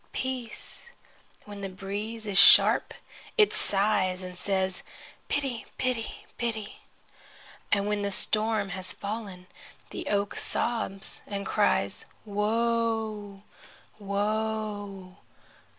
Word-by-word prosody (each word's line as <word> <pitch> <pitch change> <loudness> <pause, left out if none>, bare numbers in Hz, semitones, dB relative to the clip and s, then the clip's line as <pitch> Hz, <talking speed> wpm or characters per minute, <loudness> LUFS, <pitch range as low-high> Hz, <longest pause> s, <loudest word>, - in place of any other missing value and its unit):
Peace!' 260 - -3 0.6
When 205 -1 -8
the 195 - -3
breeze 205 +4 -5
is 200 -2 +2
sharp - - +8 0.4
it 425 -2 +5
sighs 195 -2 +1
and 180 0 -7
says: 190 0 -1 0.5
'Pity! 270 -5 -2
Pity! 250 -3 -2
Pity!' 225 -3 -3 0.9
And 200 0 +3
when 210 0 0
the 200 - 0
storm 215 +1 +2
has 185 0 -4
fallen, 200 -3 -6 0.5
the 345 - -5
oak 200 -3 +1
sobs 220 -5 -1
and 200 -1 -4
cries: - - +1 0.2
'Woe! 215 -1 0 0.6
Woe! 205 -2 -2
205 Hz, 100 wpm, -28 LUFS, 195-225 Hz, 0.9 s, sharp